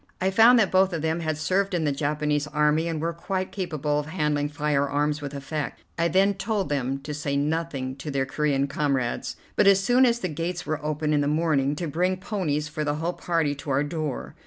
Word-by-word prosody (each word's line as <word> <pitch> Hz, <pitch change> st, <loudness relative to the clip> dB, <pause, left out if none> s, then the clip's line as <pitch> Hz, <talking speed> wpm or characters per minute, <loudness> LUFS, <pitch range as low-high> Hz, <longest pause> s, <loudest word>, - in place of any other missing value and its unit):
I 190 Hz, +1 st, +1 dB
found 230 Hz, +5 st, +7 dB
that 215 Hz, -5 st, +3 dB
both 190 Hz, 0 st, +3 dB
of 160 Hz, -2 st, -3 dB
them 160 Hz, +1 st, 0 dB
had 155 Hz, -2 st, -2 dB
served 190 Hz, +4 st, 0 dB
in 170 Hz, -, 0 dB
the 150 Hz, -, +1 dB
Japanese 150 Hz, +1 st, -1 dB
army 150 Hz, +2 st, +2 dB
and 165 Hz, -2 st, -2 dB
were 165 Hz, +2 st, -1 dB
quite 185 Hz, +2 st, -3 dB
capable 155 Hz, -6 st, -1 dB
of 150 Hz, -, -5 dB
handling 150 Hz, -3 st, 0 dB
firearms 145 Hz, 0 st, 0 dB
with 145 Hz, 0 st, -6 dB
effect. 145 Hz, +1 st, -4 dB
I 170 Hz, 0 st, +1 dB
then 190 Hz, +4 st, +3 dB
told 195 Hz, -2 st, -2 dB
them 135 Hz, -2 st, -1 dB
to 150 Hz, +2 st, -6 dB
say 145 Hz, -1 st, -2 dB
nothing 145 Hz, -3 st, -2 dB
to 145 Hz, +3 st, -6 dB
their 135 Hz, -2 st, 0 dB
Corean 140 Hz, 0 st, 0 dB
comrades, 135 Hz, -4 st, -1 dB, 0.2 s
but, 205 Hz, -, +4 dB
as 195 Hz, -1 st, +7 dB
soon 250 Hz, +4 st, +5 dB
as 235 Hz, 0 st, +2 dB
the 210 Hz, -, -3 dB
gates 170 Hz, +2 st, -4 dB
were 155 Hz, -1 st, -3 dB
open 150 Hz, 0 st, -1 dB
in 145 Hz, -, +3 dB
the 145 Hz, -, 0 dB
morning, 150 Hz, -2 st, +1 dB
to 170 Hz, -, -3 dB
bring 180 Hz, +5 st, 0 dB
ponies 170 Hz, -7 st, -2 dB
for 150 Hz, +1 st, -4 dB
the 145 Hz, 0 st, 0 dB
whole 165 Hz, +3 st, -2 dB
party 165 Hz, -5 st, 0 dB
to 145 Hz, +1 st, -8 dB
our 135 Hz, +1 st, +2 dB
door. 150 Hz, -2 st, -4 dB
150 Hz, 220 wpm, -25 LUFS, 145-175 Hz, 0.2 s, found